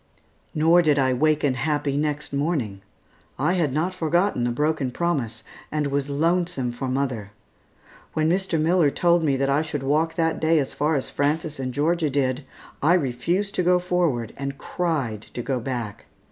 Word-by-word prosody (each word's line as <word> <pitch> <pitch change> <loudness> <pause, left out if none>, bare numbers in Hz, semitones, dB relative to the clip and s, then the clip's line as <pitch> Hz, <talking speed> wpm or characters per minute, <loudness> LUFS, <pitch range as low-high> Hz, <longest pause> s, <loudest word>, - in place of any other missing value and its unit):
Nor 165 +3 +5
did 150 -4 +3
I 130 -2 +3
waken 150 +1 +2
happy 145 +1 -1
next 150 0 -2
morning. 140 - -1 0.6
I 180 - +1
had 165 -7 +1
not 160 +7 0
forgotten 175 -5 +1
the - - +1
broken 150 +1 0
promise, 125 -8 -2 0.3
and 150 -1 0
was 140 0 -1
lonesome 165 -3 0
for 125 +2 -4
mother. 130 -6 -2 0.8
When 155 0 +1
Mr. 180 -1 +1
Miller 165 -1 +3
told 170 +3 +2
me 140 -3 +2
that 135 +1 +1
I 140 +2 +2
should 150 -3 -4
walk 155 +4 +1
that 165 -1 0
day 160 +1 +3
as 140 -3 0
far 150 +2 +1
as 135 - -2
Frances 150 +1 -1
and 130 -1 -2
Georgia 155 +3 +1
did, 130 0 0 0.4
I 165 +5 +5
refused 175 +7 -1
to - - 0
go 180 +1 +4
forward, 175 -10 0
and 140 0 -4
cried 140 - -2
to 120 - -3
go 130 0 -1
back. 120 -4 -5
150 Hz, 175 wpm, -24 LUFS, 130-165 Hz, 0.8 s, Nor